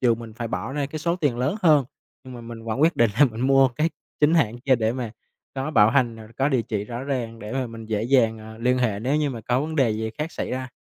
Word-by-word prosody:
dù 120 -3 +4
mình 115 -1 -9
phải 120 -1 -4
bỏ 115 +4 -4
ra 145 -1 -1
cái 155 +2 -6
số 170 +2 0
tiền 145 -9 0
lớn 135 - 0
hơn, 150 -5 +5 0.4
nhưng 130 -1 -10
mà 120 - -8
mình 115 -1 -9
vẫn 115 +3 -2
quyết 165 +2 +3
định 115 -2 +4
là - - +10
mình 115 -3 -3
mua 135 0 +5
cái 150 +7 -1 0.3
chính 150 +3 +4
hãng 120 -7 +2
kia 130 +1 +3
để 110 0 0
mà 125 -3 -4 0.4
có 135 +3 -3
bảo 110 -6 +5
hành 120 -3 +2
rồi 110 -1 -11
có 135 +2 +2
địa 130 -5 +1
chỉ 105 -2 -3
rõ 120 +3 -6
ràng 120 -5 -3
để 105 0 -7
mà 130 -1 -1
mình 115 -1 -9
dễ 110 -1 -1
dàng, 115 -3 +3
à, 110 0 -11
liên 125 +2 +2
hệ 110 -5 0
nếu 130 +6 +1
như 150 -2 +1
mà 120 -3 -6
có 125 +4 0
vấn 160 +2 -3
đề 130 -5 +3
gì 110 +1 -2
khác 155 +2 -3
xảy - - -4
ra. 130 0 -3
125 Hz, 290 wpm, -24 LUFS, 115-140 Hz, 0.4 s, là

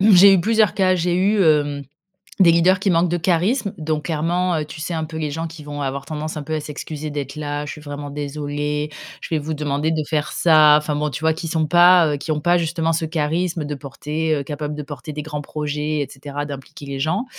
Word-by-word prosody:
J'ai 200 -1 +8
eu 180 - +3
plusieurs 220 +1 +2
cas. 185 -1 +3
J'ai 175 0 0
eu, 195 +3 +3
hem, 145 -3 +2 0.6
des 170 -3 +7
leaders 180 +3 +4
qui 195 0 +1
manquent 170 +1 +3
de 175 - +1
charisme, 190 +6 +1
donc, 155 -1 -2
clairement, 175 +3 0
heu, 150 - -2
tu 155 +1 -10
sais, 170 +3 -3
un 160 - -2
peu 160 +1 -6
les 155 -2 -2
gens 165 +2 -3
qui 160 -2 -11
vont 145 0 -5
avoir 135 0 -3
tendance 155 +1 -5
un 150 - -5
peu 160 +2 -3
à 155 - -1
s'excuser 150 +1 -6
d'être 140 -2 -4
là: 145 -1 -4
«Je - - -5
suis 150 - -10
vraiment 145 -1 -7
désolé. 145 +1 -3 0.3
Je 165 - -4
vais 155 - +1
vous 155 +2 -4
demander 150 +1 -1
de 155 -1 0
faire 155 -1 -1
ça». 155 -3 +6
Enfin, 150 0 -2
bon, 150 +1 -1
tu - - -5
vois, 160 0 +3
qui 165 +1 -5
sont 160 -1 0
pas 175 -1 +6
heu, - - -1
qui 150 +3 -6
ont 150 - +1
pas 175 +3 +3
justement 165 -1 0
ce 160 0 -1
charisme 165 +1 -1
de 145 0 -3
porter, 150 +3 -3
heu, 140 - -3
capable 150 +1 -4
de 150 - -5
porter 145 +1 -8
des 150 - -5
grands 150 -1 -5
projets, 150 +1 -3
et 145 - -1
cetera, 145 +1 -6
d'impliquer 140 0 -9
les 135 -1 -5
gens, 180 - 0
155 Hz, 245 wpm, -21 LUFS, 145-170 Hz, 0.6 s, J'ai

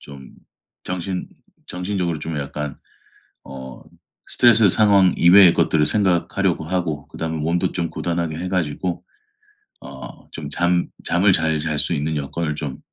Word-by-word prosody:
좀 70 -2 -12 0.5
정신 90 0 -4 0.4
정신적으로 90 -2 -2
좀 80 0 -5
약간 75 0 -5 0.7
어 65 -2 -10 0.5
스트레스 115 -4 +5
상황 100 -2 +4
이외의 90 0 +7
것들을 75 -1 +2
생각하려고 95 -3 0
하고 80 -5 -3
그다음에 80 0 -4
몸도 85 +3 0
좀 85 -2 -2
고단하게 85 -1 -3
해 90 - -4
가지고 90 0 -2 0.8
어 65 -3 -11
좀 75 -3 -7
잠 85 +3 +1 0.2
잠을 95 +3 +3
잘 80 -2 +1
잘 75 -1 -2
수 75 - 0
있는 75 +1 -2
여건을 75 +2 -3
좀 70 -4 -5
85 Hz, 280 characters per minute, -21 LUFS, 75-90 Hz, 0.8 s, 이외의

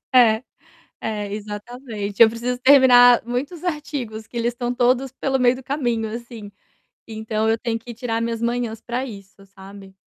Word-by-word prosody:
É. 230 -2 +5 0.6
É, 210 -2 -4
exatamente, 210 0 -7
eu 225 - +8
preciso 240 +2 -3
terminar 250 -3 +7
muitos 275 +8 -4
artigos, 290 -10 -4
que - - -13
eles 235 +1 0
estão 240 0 -3
todos 250 +2 +1
pelo 265 0 -1
meio 250 0 +4
do 260 - -10
caminho, 240 -5 -2
assim. 235 -3 -8 0.6
Então 220 0 -2
eu 225 - +2
tenho 230 0 -2
que 235 +1 -10
tirar 230 -1 -3
minhas 230 0 -3
manhãs 235 -2 -2
para 250 +2 -3
isso, 195 -3 -12
sabe. 195 0 -13
235 Hz, 160 wpm, -21 LUFS, 220-250 Hz, 0.6 s, eu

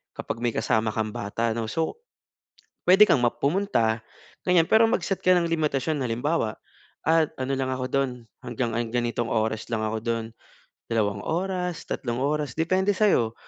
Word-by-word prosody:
kapag - - -4
may 120 - +2
kasama 110 0 +1
kang 110 -1 -1
bata 115 +3 -2
no 115 - -1
so, 160 - -2 0.9
puwede 190 +3 +8
kang 140 - +4
ma - - +5
pumunta 140 - +1 0.5
ganiyan 180 -2 +5
pero 220 +1 +6
mag-set 195 -3 0
ka 185 - +6
ng 170 - +1
limitasyon 150 -2 0
halimbawa 120 -1 -1 0.5
"Ah 160 0 +4
ano 130 +1 -2
lang 135 0 -1
ako 130 0 -3
doon 135 -1 +2 0.3
hanggang, 120 0 -2
ah, 120 - +1
ganitong 120 0 -1
oras 110 -1 -1
lang 110 -1 0
ako 110 0 -1
doon." 115 -1 -1 0.6
Dalawang 105 -4 0
oras 180 0 -2
tatlong 120 -1 -2
oras 145 -1 -1
depende 185 +5 +2
sa'yo 185 - +3
130 Hz, 160 wpm, -25 LUFS, 115-165 Hz, 0.9 s, puwede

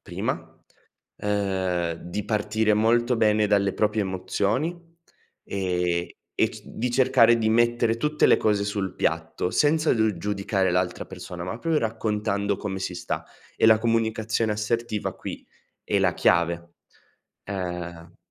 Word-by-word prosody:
prima, - - -5 0.6
ehm, 95 -4 -1
di 90 +5 -5
partire 110 0 +1
molto 120 +3 +3
bene 110 -1 +3
dalle 100 -1 +2
proprie 105 0 +1
emozioni 100 - -1 0.7
e 90 -2 -1 0.2
e - - +2
c - - -11
di 125 +2 -3
cercare 120 -2 +5
di 110 - 0
mettere 120 0 +3
tutte 150 +4 +2
le - - +6
cose 105 -2 +1
sul 100 -2 -3
piatto, 90 - -1
senza 155 - +3
d 110 -5 +1
giudicare 100 -1 0
l'altra 90 0 -1
persona, 90 -1 -8
ma 115 +6 -5
pro 165 -2 +1
raccontando 105 -3 -1
come 95 -1 -4
si 90 -1 -4
sta - - -4 0.3
e - - +4
la 110 - +7
comunicazione 115 -1 0
assertiva 110 0 -2
qui - - -7 0.4
è - - +1
la - - +2
chiave. 85 0 +1 0.7
Ehm 90 -3 -5
105 Hz, 135 wpm, -25 LUFS, 95-115 Hz, 0.7 s, la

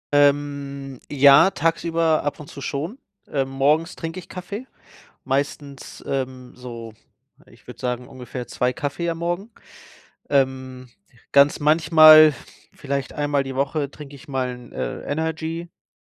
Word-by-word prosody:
Ähm, 140 -2 +1
ja, 140 +4 +7
tagsüber 165 -1 +1
ab 145 - -3
und 150 - -10
zu 140 - -10
schon. 160 - -4 0.3
Äh, 135 -2 -1
morgens 145 +6 +1
trinke 165 +2 -6
ich 175 - -13
Kaffee, 200 +7 -7 0.6
meistens, 140 0 -4
ähm, 130 -2 -4
so, 115 -3 -9 0.5
ich - - -21
würde - - -11
sagen, 125 0 -3
ungefähr 125 -1 -7
2 125 0 -1
Kaffee 160 +6 -3
am 165 - -4
Morgen. 175 +6 -3 0.8
Ähm, 130 -2 -1 0.5
ganz 140 +2 +5
manchmal, 155 0 +7 0.4
vielleicht 140 -1 -4
einmal 145 -1 0
die 135 -1 -6
Woche 140 +1 -1
trinke 145 -2 -11
ich 140 - -15
mal 130 -2 -2
'n, 125 -1 -14
äh, - - -4
Energydrink. 160 +2 -4
145 Hz, 135 wpm, -22 LUFS, 135-160 Hz, 0.8 s, ja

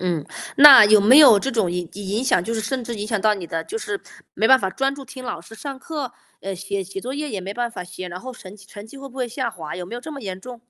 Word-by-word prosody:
嗯， 175 -5 -2 0.3
那 280 -5 +10
有 210 0 +6
没 235 +8 +7
有 255 -9 +8
这 270 - -3
种 220 -8 0
影 175 -2 -4
影 205 +1 -8
影 215 +6 -1
响， 185 -8 +2
就 230 +5 -4
是 220 - -2
甚 250 +4 -3
至 235 0 -5
影 210 0 -5
响 215 -2 -1
到 215 +1 +3
你 185 -4 -7
的 165 0 -3
就 440 - -6
是 415 -2 -5 0.3
没 220 - +1
办 265 0 +7
法 190 -2 -2
专 270 +5 -1
注 275 - -10
听 260 -1 -11
老 175 - -5
师 200 +6 -14
上 275 +3 -7
课， 290 -3 -5 0.3
呃， 195 0 -5
写 195 +2 -4
写 195 +1 -7
作 250 +4 -6
业 300 +1 -4
也 210 -7 -4
没 195 +2 -6
办 240 +1 -3
法 180 -6 -7
写， 180 +1 -8
然 175 - -7
后 260 +7 -8
成 205 -4 -13
绩 195 - -17
成 205 +1 -11
绩 275 - -14
会 275 0 -9
不 265 - -17
会 250 -2 -2
下 235 0 -3
滑， 160 -4 -8
有 180 - -6
没 205 +7 -9
有 245 - -6
这 315 - -9
么 280 - -8
严 190 -5 -6
重？ 245 +1 -10
220 Hz, 335 characters per minute, -21 LUFS, 190-260 Hz, 0.3 s, 那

